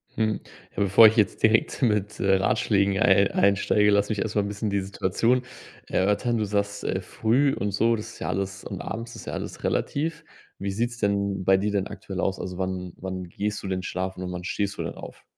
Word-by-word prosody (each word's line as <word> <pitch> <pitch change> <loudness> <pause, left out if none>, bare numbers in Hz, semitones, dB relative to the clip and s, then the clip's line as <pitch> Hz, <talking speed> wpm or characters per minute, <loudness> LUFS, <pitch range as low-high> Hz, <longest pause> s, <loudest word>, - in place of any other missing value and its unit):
Hm. 110 -1 0 0.4
Ja, 100 - +1
bevor 100 +3 +7
ich 110 - +2
jetzt 105 -3 +1
direkt 110 0 +3
mit, 105 -3 +1
äh, 95 +1 +3
Ratschlägen 100 -2 +2
ei 100 +1 +4
einsteige, 100 +1 +3
lass 100 0 +2
mich 105 -3 -1
erstmal 105 -1 0
'n - - -3
bisschen 105 +1 -3
die 100 -1 0
Situation 105 +6 0 0.4
erörtern. 105 +5 +1
Du 110 - 0
sagst: 100 0 -2
„Äh, 95 - -1
früh” 125 +9 +1
und 100 +1 -2
so, 115 +4 +2
das 115 +1 -7
ist - - -14
ja - - -3
alles 95 0 -3
und - - -6
abends 115 +1 -6
ist - - -10
ja - - -4
alles - - -6
relativ. 160 +3 -1 0.3
Wie 100 0 -3
sieht's 120 +4 -2
denn 100 -3 0
bei 95 0 +5
dir 105 +2 -1
denn 100 -1 0
aktuell 95 -1 -7
aus? 95 0 -1
Also, 90 -1 -5
wann 95 -1 -3
wann 95 0 -5
gehst 105 +3 -3
du - - -4
denn 95 -1 -2
schlafen 95 0 -4
und 90 - -4
wann 90 0 -5
stehst 100 +2 -2
du - - -2
denn - - -5
auf? - - -11
100 Hz, 220 wpm, -25 LUFS, 95-110 Hz, 0.4 s, bevor